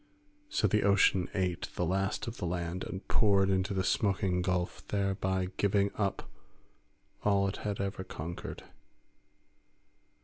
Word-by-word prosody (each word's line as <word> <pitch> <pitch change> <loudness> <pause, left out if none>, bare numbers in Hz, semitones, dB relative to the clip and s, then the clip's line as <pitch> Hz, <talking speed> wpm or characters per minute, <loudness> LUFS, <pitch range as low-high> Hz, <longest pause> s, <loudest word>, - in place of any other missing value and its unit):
So 310 - +1
the 105 - +2
ocean 95 -2 +4
ate 90 -3 -1
the 90 - 0
last 95 +3 0
of 115 0 -6
the 90 - -2
land 85 +1 -2
and 95 - -6
poured 100 -3 +4
into 95 +2 +1
the 95 -1 0
smoking 95 -2 +1
gulf, 90 -1 -1
thereby 95 -2 0
giving 100 0 +2
up 100 -2 -1 1.0
all 100 -1 +3
it 100 - -3
had 105 -1 -3
ever 100 -1 -2
conquered. 85 0 -6
95 Hz, 135 wpm, -31 LUFS, 90-100 Hz, 1.0 s, ocean